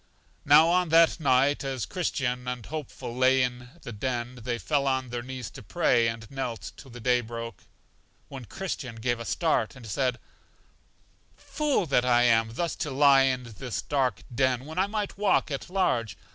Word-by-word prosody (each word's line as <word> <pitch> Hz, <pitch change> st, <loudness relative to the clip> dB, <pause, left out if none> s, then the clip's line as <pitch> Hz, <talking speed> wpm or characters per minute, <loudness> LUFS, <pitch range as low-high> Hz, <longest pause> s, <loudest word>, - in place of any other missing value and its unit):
Now, 150 Hz, +3 st, +7 dB
on 180 Hz, -1 st, +2 dB
that 165 Hz, +1 st, +5 dB
night, 140 Hz, -1 st, +2 dB
as 135 Hz, -3 st, -3 dB
Christian 130 Hz, -8 st, -2 dB
and 125 Hz, -2 st, -4 dB
Hopeful 150 Hz, -6 st, -6 dB
lay 130 Hz, +1 st, +4 dB
in 125 Hz, 0 st, -4 dB
the -, -, -7 dB
den, 120 Hz, +2 st, -4 dB
they 120 Hz, +1 st, -2 dB
fell 140 Hz, +2 st, 0 dB
on 130 Hz, -2 st, -1 dB
their 120 Hz, 0 st, -3 dB
knees 125 Hz, -2 st, -7 dB
to -, -, -10 dB
pray, 120 Hz, -9 st, +2 dB
and 115 Hz, -1 st, -4 dB
knelt 125 Hz, -8 st, -4 dB
till 135 Hz, -, -13 dB
the 120 Hz, 0 st, -10 dB
day 125 Hz, +1 st, +2 dB
broke; 115 Hz, -3 st, -8 dB, 0.6 s
when 135 Hz, -3 st, -9 dB
Christian 140 Hz, -, -5 dB
gave 120 Hz, +1 st, -1 dB
a 115 Hz, -, -6 dB
start, 155 Hz, -9 st, 0 dB
and 130 Hz, -3 st, -12 dB
said: 125 Hz, +4 st, -1 dB, 1.2 s
Fool 295 Hz, -, -1 dB
that 135 Hz, -5 st, +2 dB
I 120 Hz, -1 st, +4 dB
am 115 Hz, -1 st, +3 dB
thus 170 Hz, +3 st, -2 dB
to 155 Hz, -, -3 dB
lie 135 Hz, -1 st, +5 dB
in 130 Hz, -1 st, 0 dB
this 120 Hz, +1 st, -6 dB
dark 130 Hz, -8 st, 0 dB
den 130 Hz, 0 st, +1 dB
when 160 Hz, +4 st, -5 dB
I 190 Hz, -, +2 dB
might 205 Hz, -1 st, -4 dB
walk 205 Hz, -6 st, +2 dB
at 140 Hz, -, -4 dB
large! 125 Hz, -, 0 dB
130 Hz, 180 wpm, -27 LUFS, 120-145 Hz, 1.2 s, Now